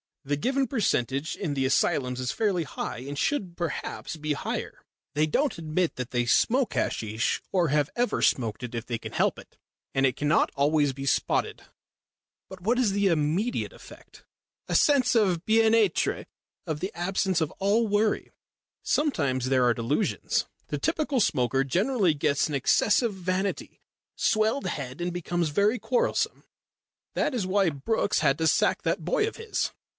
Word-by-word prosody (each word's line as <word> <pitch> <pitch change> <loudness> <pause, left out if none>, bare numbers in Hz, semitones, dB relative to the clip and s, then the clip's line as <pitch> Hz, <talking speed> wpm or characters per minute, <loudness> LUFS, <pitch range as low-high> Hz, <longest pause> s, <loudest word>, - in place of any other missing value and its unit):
The 145 +1 -1
given 265 - 0
percentage 145 - 0
in 170 -8 -3
the 135 -1 0
asylums 130 -1 +1
is 125 -1 -1
fairly 200 -6 0
high, 135 - -5
and 140 +3 -7
should 190 - -1
perhaps 165 -1 -4
be 150 -1 -1
higher. - - -5 0.3
They 150 +1 +3
don't 275 - 0
admit 165 +2 -1
that 125 -1 -5
they 120 -1 0
smoke 245 - +2
hasheesh 110 +2 -1
or 180 -3 +2
have 150 0 +1
ever 245 0 0
smoked 115 -4 +1
it 125 -1 -6
if 115 +1 -4
they 120 - -3
can - - -8
help - - +1
it, - - -16 0.4
and 135 0 +3
it 130 -2 +1
cannot 150 +3 +2
always 145 0 +2
be 135 +1 -6
spotted." - - 0 0.9
"But 190 -1 -10
what 230 +7 +1
is 245 -5 +2
the 200 0 +2
immediate 170 +7 0
effect?" - - -15 0.4
"A - - -1
sense 265 -5 +4
of 185 -6 +2
bien 225 0 +4
étre, 215 -7 +2 0.4
of 155 -1 -2
the 190 - -3
absence 185 +1 0
of 160 - 0
all 210 +4 +2
worry. 210 +1 0 0.5
Sometimes 140 - 0
there 130 -2 +3
are 120 - +4
delusions. 120 - -1 0.2
The - - -3
typical 305 -4 0
smoker 135 - +2
generally 190 - +1
gets 145 -1 +1
an 150 - -3
excessive 210 - +2
vanity 185 +1 -3 0.3
swelled 220 +5 +1
head 135 -1 -5
and 175 0 -2
becomes 175 -1 -1
very 205 +10 +2
quarrelsome. 225 +4 0 0.7
That 295 - 0
is 200 -6 -1
why 195 -1 +3
Brookes 205 +9 0
had 145 -3 +2
to 160 - +2
sack - - +2
that - - -1
boy 440 -4 +1
of 450 - -6
his." 455 -2 -2
175 Hz, 165 wpm, -27 LUFS, 140-215 Hz, 0.9 s, sense